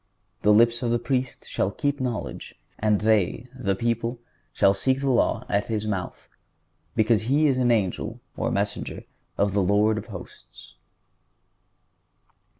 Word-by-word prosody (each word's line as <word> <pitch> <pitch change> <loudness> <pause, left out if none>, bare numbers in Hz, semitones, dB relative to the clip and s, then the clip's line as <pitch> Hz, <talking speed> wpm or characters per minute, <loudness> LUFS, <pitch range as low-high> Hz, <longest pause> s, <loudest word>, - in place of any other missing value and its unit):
"The 105 - +4
lips 115 +3 +4
of 120 - 0
the 120 - +2
Priest 125 +2 -2
shall 95 - 0
keep 145 +7 -2
knowledge, 125 -4 -4 0.2
and 105 -1 +2
they 110 +2 +1
(the 100 -7 -1
people) 115 +2 -1 0.3
shall 100 - +4
seek 130 +7 +1
the 135 -1 +1
law 120 - +1
at 100 0 0
his 110 -2 -2
mouth, 95 -4 -4 0.7
because 110 0 +2
he 145 +5 +3
is 135 -3 +3
the 125 -1 +3
angel 100 -6 -1 0.2
(or - - -1
messenger) - - -2 0.3
of 100 -1 +1
the 100 - +2
Lord 105 +3 +3
of - - -10
hosts." - - -11
115 Hz, 150 wpm, -25 LUFS, 105-125 Hz, 0.7 s, The